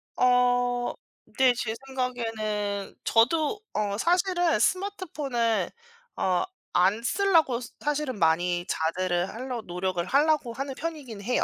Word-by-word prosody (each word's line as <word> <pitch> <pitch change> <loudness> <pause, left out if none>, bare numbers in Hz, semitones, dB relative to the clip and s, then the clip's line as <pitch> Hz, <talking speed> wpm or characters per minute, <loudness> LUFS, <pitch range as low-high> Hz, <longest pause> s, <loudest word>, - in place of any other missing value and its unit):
어. 245 -1 +2 0.4
네. 260 -2 +5
제 230 -2 -3
생각에는 220 -6 -3
저도 310 - +2
어 205 -1 -1
사실은 350 - +2
스마트폰을 285 - 0 0.5
어 185 -1 +1 0.3
안 195 +5 +3
쓰려고 330 -3 +3
스 235 - -9
사실은 295 -6 -1
많이 175 +1 +2
자제를 175 +2 0
하려고 245 -1 -5
노력을 180 -1 -2
하려고 285 -3 +2
하는 270 +2 -4
편이긴 290 -8 -6
해요. 245 +5 +1
245 Hz, 250 characters per minute, -27 LUFS, 205-290 Hz, 0.5 s, 네